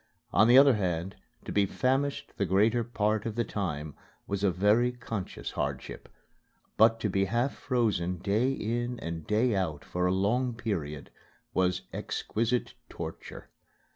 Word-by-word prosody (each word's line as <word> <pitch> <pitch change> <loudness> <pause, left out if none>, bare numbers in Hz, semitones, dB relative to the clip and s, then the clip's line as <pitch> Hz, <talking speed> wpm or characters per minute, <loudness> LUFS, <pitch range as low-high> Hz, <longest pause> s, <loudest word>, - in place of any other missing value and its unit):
On 110 +4 +6
the 120 +2 +7
other 140 0 +8
hand, 90 -3 -2 0.3
to - - -5
be 100 -1 +2
famished 135 +5 0
the 100 - +1
greater 110 +6 +3
part 110 -1 0
of 110 - -4
the 120 - +1
time 80 -9 -4 0.3
was 100 0 -3
a 100 - +4
very 105 +7 +3
conscious 115 -5 -5
hardship. - - -4 0.7
But 115 +1 +5
to 110 - +1
be 95 0 +1
half 120 +6 0
frozen, 105 -8 0
day 105 +8 +1
in 120 0 -2
and 85 -2 -5
day 110 +2 +2
out 80 -7 -2
for 90 0 -1
a - - +2
long 115 +6 +1
period, 85 -11 -4 0.4
was 90 -1 +1
exquisite 115 +3 -2 0.2
torture. - - -8
105 Hz, 150 wpm, -29 LUFS, 95-120 Hz, 0.7 s, other